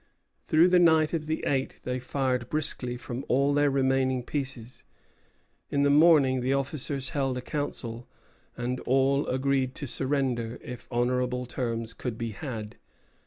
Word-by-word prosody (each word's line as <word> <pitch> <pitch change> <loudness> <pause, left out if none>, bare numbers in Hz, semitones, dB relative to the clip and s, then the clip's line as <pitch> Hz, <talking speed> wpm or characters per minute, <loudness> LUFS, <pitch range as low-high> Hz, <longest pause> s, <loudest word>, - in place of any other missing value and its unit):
Through 165 +3 +5
the 180 0 +5
night 160 -2 +4
of 155 -2 -2
the 160 0 -2
eighth 135 -1 -1
they 125 0 -2
fired 130 -1 -1
briskly 130 -5 -1
from 125 +1 -6
all 140 +2 +2
their 145 0 +3
remaining 130 -1 +1
pieces. 130 -4 -5 0.9
In 140 0 +1
the 140 - +4
morning 145 -4 +5
the 130 +2 +1
officers 135 -1 -2
held 135 -3 -1
a - - -3
council, 125 -4 -4 0.5
and 125 +1 -2
all 135 +2 +2
agreed 130 0 0
to 145 - -4
surrender 130 -3 -1
if 125 -2 -8
honorable 125 +1 0
terms 115 -2 -3
could 120 -1 -5
be 115 -1 -3
had. 110 -4 -6
130 Hz, 150 wpm, -27 LUFS, 125-140 Hz, 0.9 s, Through